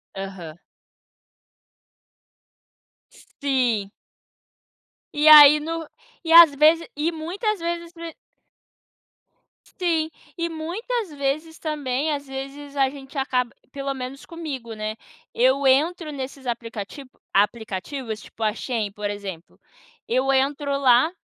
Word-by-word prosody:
Aham. 190 Hz, -5 st, -7 dB, 2.5 s
Sim. 245 Hz, -8 st, -2 dB, 1.2 s
E 295 Hz, +1 st, +2 dB
aí 300 Hz, -1 st, +10 dB
no 325 Hz, +1 st, -4 dB, 0.4 s
e 325 Hz, -, -3 dB
às 335 Hz, -3 st, +10 dB
vezes 315 Hz, +3 st, +4 dB
e 305 Hz, +3 st, 0 dB
muitas 365 Hz, +6 st, -3 dB
vezes 340 Hz, 0 st, -4 dB
no 335 Hz, -, -10 dB
e 330 Hz, -, -7 dB, 1.5 s
Sim, 330 Hz, -4 st, -1 dB, 0.3 s
e 335 Hz, 0 st, -1 dB
muitas 380 Hz, +8 st, -4 dB
vezes 295 Hz, +3 st, -3 dB
também, 295 Hz, -1 st, -2 dB
às 285 Hz, -1 st, -3 dB
vezes, 275 Hz, +2 st, -8 dB
a 270 Hz, -1 st, +3 dB
gente 275 Hz, +1 st, -11 dB
acaba 250 Hz, -3 st, 0 dB, 0.2 s
pelo 275 Hz, 0 st, -3 dB
menos 265 Hz, +1 st, -7 dB
comigo, 280 Hz, -9 st, -6 dB
né, 215 Hz, 0 st, -4 dB, 0.4 s
eu 265 Hz, +3 st, +3 dB
entro 310 Hz, +4 st, +2 dB
nesses 270 Hz, -1 st, -7 dB
aplicativ 230 Hz, +2 st, -5 dB, 0.3 s
aplicativos, 220 Hz, +3 st, -1 dB
tipo -, -, -15 dB
a 215 Hz, -1 st, +1 dB
Shein, 225 Hz, -3 st, -3 dB
por 205 Hz, +1 st, -4 dB
exemplo, 195 Hz, -5 st, -8 dB, 0.5 s
eu 260 Hz, +3 st, +1 dB
entro 280 Hz, +2 st, 0 dB
lá, 255 Hz, +3 st, +4 dB
275 Hz, 115 wpm, -23 LUFS, 240-315 Hz, 2.5 s, aí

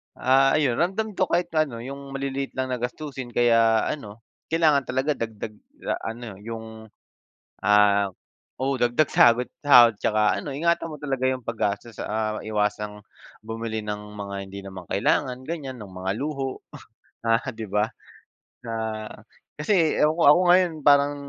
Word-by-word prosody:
Ah, 135 Hz, +1 st, +4 dB
ayun 140 Hz, -5 st, +1 dB
ramdam 195 Hz, +5 st, 0 dB
ko 185 Hz, -2 st, 0 dB
kahit 175 Hz, 0 st, 0 dB
pa'no 145 Hz, -8 st, -1 dB
'yung 140 Hz, +2 st, -8 dB
maliliit 135 Hz, 0 st, -3 dB
lang 130 Hz, 0 st, -2 dB
na 125 Hz, -, -2 dB
gastusin 130 Hz, +1 st, -5 dB
kaya 115 Hz, -2 st, +4 dB
ano, 110 Hz, -5 st, -5 dB, 0.2 s
kailangan 155 Hz, -4 st, +2 dB
talaga 130 Hz, +4 st, 0 dB
dagdag 110 Hz, -5 st, -4 dB, 0.3 s
a 115 Hz, -, -3 dB
ano 115 Hz, -5 st, -9 dB
'yung, 110 Hz, 0 st, -8 dB, 0.7 s
ah 100 Hz, 0 st, +4 dB, 0.5 s
oo, 135 Hz, +1 st, 0 dB
dagdag 120 Hz, +6 st, +3 dB
sahod 120 Hz, +1 st, +5 dB, 0.2 s
sahod 120 Hz, -5 st, +7 dB
'tsaka 105 Hz, 0 st, +2 dB
ano 150 Hz, -, -6 dB
ingatan 165 Hz, +4 st, 0 dB
mo 155 Hz, -, -7 dB
talaga 135 Hz, -3 st, -1 dB
'yung 130 Hz, -3 st, -3 dB
paggastos, 110 Hz, -1 st, -3 dB
ah, 110 Hz, 0 st, -2 dB
iwasang 105 Hz, -1 st, -2 dB, 0.5 s
bumili 110 Hz, -1 st, -4 dB
ng 105 Hz, 0 st, -4 dB, 0.2 s
mga 100 Hz, -1 st, -5 dB
hindi 100 Hz, +1 st, -8 dB
naman 95 Hz, -3 st, -9 dB
kailangan 125 Hz, +5 st, +1 dB
ganiyan, 140 Hz, -6 st, -5 dB
ng 105 Hz, -4 st, -10 dB
mga 95 Hz, +1 st, -3 dB
luho, 135 Hz, -1 st, -4 dB, 0.6 s
ah, 115 Hz, +2 st, +1 dB
'di 110 Hz, -3 st, -7 dB
ba. 105 Hz, +1 st, +2 dB, 0.8 s
Ah, 110 Hz, -2 st, -4 dB, 0.5 s
kasi 165 Hz, -1 st, +3 dB
ewan 155 Hz, +1 st, +3 dB
ko 170 Hz, -, +2 dB
ako 175 Hz, -, +3 dB
ngayon 180 Hz, -1 st, +5 dB
parang 145 Hz, 0 st, +4 dB
120 Hz, 150 wpm, -24 LUFS, 110-145 Hz, 0.8 s, sahod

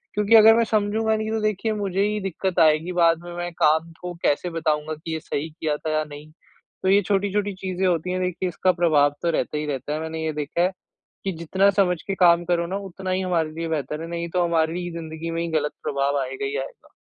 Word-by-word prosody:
क्योंकि 210 Hz, +2 st, +4 dB
अगर 225 Hz, 0 st, +9 dB
मैं 230 Hz, -, +4 dB
समझूँगा 220 Hz, +1 st, +1 dB
नहीं, 215 Hz, 0 st, -3 dB
तो 225 Hz, -, 0 dB
देखिए, 215 Hz, +1 st, 0 dB
मुझे 195 Hz, -2 st, -1 dB
ही 210 Hz, 0 st, 0 dB
दिक्कत 190 Hz, 0 st, -2 dB
आएगी। 155 Hz, +2 st, +4 dB
बाद 165 Hz, -2 st, +4 dB
में 175 Hz, 0 st, -8 dB
मैं 175 Hz, 0 st, -3 dB
काम 160 Hz, +1 st, +3 dB
को 180 Hz, 0 st, -5 dB
कैसे 175 Hz, +5 st, +1 dB
बताऊँगा 155 Hz, -1 st, -1 dB
कि 160 Hz, +1 st, -6 dB
ये 160 Hz, -, -2 dB
सही 155 Hz, +1 st, -4 dB
किया 155 Hz, -1 st, -2 dB
था 155 Hz, -, -4 dB
या 155 Hz, -, +1 dB
नहीं? 150 Hz, +1 st, -11 dB, 0.5 s
तो 190 Hz, -, +2 dB
ये 200 Hz, +1 st, +5 dB
छोटी-छोटी 205 Hz, +1 st, 0 dB
चीज़ें 190 Hz, 0 st, -2 dB
होती 175 Hz, 0 st, 0 dB
हैं, 185 Hz, 0 st, -1 dB
देखिए, 180 Hz, 0 st, -1 dB
इसका 185 Hz, +2 st, +2 dB
प्रभाव 145 Hz, -3 st, +4 dB
तो 170 Hz, -, +2 dB
रहता 155 Hz, -, -1 dB
ही 150 Hz, -, -2 dB
रहता 145 Hz, +1 st, -3 dB
है। 155 Hz, -, -2 dB
मैंने 160 Hz, 0 st, -4 dB
ये 155 Hz, -, -1 dB
देखा 150 Hz, +3 st, -2 dB
है 185 Hz, -, +2 dB, 0.5 s
कि 195 Hz, -, -1 dB
जितना 190 Hz, +4 st, +3 dB
समझ 180 Hz, -3 st, +1 dB
के 195 Hz, -, -1 dB
काम 175 Hz, -2 st, +5 dB
करो 170 Hz, -1 st, +1 dB
ना, 185 Hz, +3 st, -3 dB
उतना 190 Hz, -1 st, -6 dB
ही 185 Hz, -, +1 dB
हमारे 170 Hz, -4 st, 0 dB
लिए 165 Hz, +1 st, -4 dB
बेहतर 150 Hz, 0 st, -3 dB
है, 165 Hz, -, -6 dB
नहीं 170 Hz, 0 st, -4 dB
तो 180 Hz, -1 st, +2 dB
हमारी 170 Hz, +1 st, 0 dB
ज़िंदगी 165 Hz, 0 st, -6 dB
में 165 Hz, 0 st, -2 dB
ही 170 Hz, -, -2 dB
गलत 150 Hz, 0 st, -2 dB
प्रभाव 140 Hz, 0 st, 0 dB
आएगा 130 Hz, +1 st, -5 dB
ही 140 Hz, +1 st, -3 dB
आएगा। 135 Hz, -, -8 dB
170 Hz, 235 wpm, -23 LUFS, 155-190 Hz, 0.5 s, अगर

